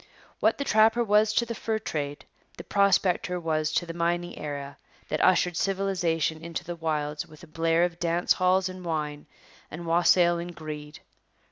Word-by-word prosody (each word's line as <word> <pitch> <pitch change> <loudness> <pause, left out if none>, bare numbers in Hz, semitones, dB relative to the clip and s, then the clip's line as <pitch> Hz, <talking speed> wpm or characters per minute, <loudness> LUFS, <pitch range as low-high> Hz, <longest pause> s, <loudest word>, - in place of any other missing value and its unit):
What - - +2
the 280 - -2
trapper 225 -1 +4
was 210 0 +3
to 235 - +2
the 230 - -4
fur 220 -1 -2
trade, 145 -9 -4 0.3
the - - -7
prospector 190 -2 +2
was 155 -2 -1
to 175 - +1
the 165 - -6
mining 175 +1 -1
era 140 -1 -6 0.3
that 155 - 0
ushered 180 -1 +3
civilization 175 -5 0
into 170 0 -5
the 175 0 -6
wilds 155 -1 -2
with 155 +1 -16
a - - -11
blare 165 +1 +1
of 175 -1 -2
dance 170 +1 +2
halls 185 +1 +2
and 185 0 -8
wine 150 -3 -3 0.4
and 170 +2 -7
wassail 170 +1 +4
and 175 0 -6
greed. 150 -1 -8
170 Hz, 170 wpm, -27 LUFS, 155-185 Hz, 0.4 s, trapper